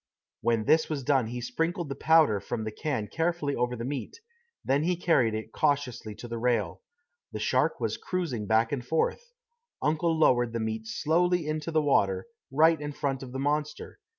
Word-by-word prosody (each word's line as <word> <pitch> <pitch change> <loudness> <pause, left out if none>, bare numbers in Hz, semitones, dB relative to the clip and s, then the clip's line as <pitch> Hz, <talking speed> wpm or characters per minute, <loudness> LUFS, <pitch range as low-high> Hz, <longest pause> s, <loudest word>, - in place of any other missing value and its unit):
When 115 -2 +1
this 160 +5 +3
was 145 -4 -3
done 130 -3 +2
he 120 +2 -5
sprinkled 165 +7 -2
the 140 - -3
powder 155 -8 +4
from 110 +2 -4
the 110 - -4
can 130 -2 -2
carefully 165 - -1
over 125 0 -1
the 115 0 -5
meat; 140 - -5 0.5
then 140 +2 +2
he 175 +3 +1
carried 160 -11 +2
it 110 - -5
cautiously 140 -8 -1
to 120 - -9
the 115 0 -5
rail. 115 -8 0 0.5
The - - -4
shark - - +1
was - - -1
cruising 150 - -3
back 110 +2 +3
and 135 -4 -2
forth. 160 - -1 0.5
Uncle 160 +2 +1
lowered 120 -6 +3
the 115 - -1
meat 110 0 -3
slowly 175 +7 +1
into 155 +1 -2
the 160 -2 +2
water, 95 -10 +2 0.3
right 160 +2 +4
in 145 0 -4
front 135 -2 -2
of 130 -2 -8
the 135 - -5
monster. 150 - -2
140 Hz, 185 wpm, -28 LUFS, 115-160 Hz, 0.5 s, powder